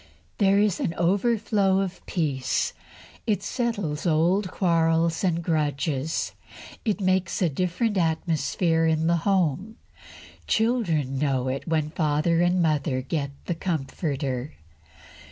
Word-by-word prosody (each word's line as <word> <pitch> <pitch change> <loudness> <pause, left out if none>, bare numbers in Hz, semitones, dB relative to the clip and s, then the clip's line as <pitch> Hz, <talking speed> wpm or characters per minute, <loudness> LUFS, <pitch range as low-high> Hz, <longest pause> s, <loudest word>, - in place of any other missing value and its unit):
There 195 -1 +4
is 205 -2 +2
an 165 - -1
overflow 200 +1 +2
of 195 -2 -3
peace. 140 -7 -1 0.5
It 205 -3 +1
settles 200 - -2
old 175 +5 +2
quarrels 165 -2 +1
and 170 -2 +1
grudges. 150 -2 -1 0.5
It 215 -3 0
makes 185 -2 +1
a 180 - +2
different 185 - -1
atmosphere 165 0 +1
in 160 0 +1
the 170 +1 +3
home. 190 +3 0 0.6
The - - -29
children 170 - +1
know 130 -3 0
it 135 +5 -4
when 155 -2 0
father 155 +1 +1
and 175 0 +3
mother 150 -4 0
get 140 +1 -2 0.2
the 175 - -1
Comforter. 140 -5 -3
165 Hz, 120 wpm, -25 LUFS, 150-190 Hz, 0.6 s, There